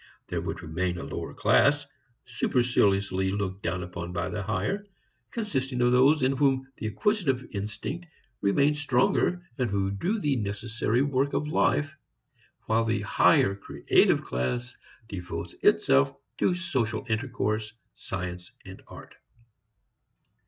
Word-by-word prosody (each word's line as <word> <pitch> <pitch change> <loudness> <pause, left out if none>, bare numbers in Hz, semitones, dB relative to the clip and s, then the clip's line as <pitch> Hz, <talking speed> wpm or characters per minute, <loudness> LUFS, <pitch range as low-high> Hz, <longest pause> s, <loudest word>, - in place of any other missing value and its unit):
There - - -2
would - - -5
remain 90 +2 -2
a - - -5
lower - - -5
class, 145 0 +3 0.4
superciliously 100 -6 +1
looked 95 -1 -3
down 90 +1 -2
upon 90 -1 -6
by 85 -2 -2
the 105 - -3
higher, 195 - -2 0.4
consisting 135 - -2
of 125 0 +4
those 135 +4 +5
in 130 - +4
whom 135 -1 +2
the 110 - -3
acquisitive 135 - 0
instinct 105 - -5 0.3
remains 140 +9 +2
stronger 145 +6 +1
and 125 -3 +1
who 100 -1 0
do 180 - -1
the 145 -8 +1
necessary 110 +3 -1
work 140 0 0
of 150 - 0
life, 145 -1 +1 0.7
while 110 +1 +2
the 115 -3 0
higher 100 -1 +4
"creative" 100 - +2
class 120 - -2 0.3
devotes 85 -4 -6
itself 70 0 +4 0.2
to 180 - +2
social 130 -11 -2
intercourse, 110 -2 -1 0.2
science 90 -1 -6
and - - -10
art. - - -12
115 Hz, 130 wpm, -27 LUFS, 95-140 Hz, 0.7 s, those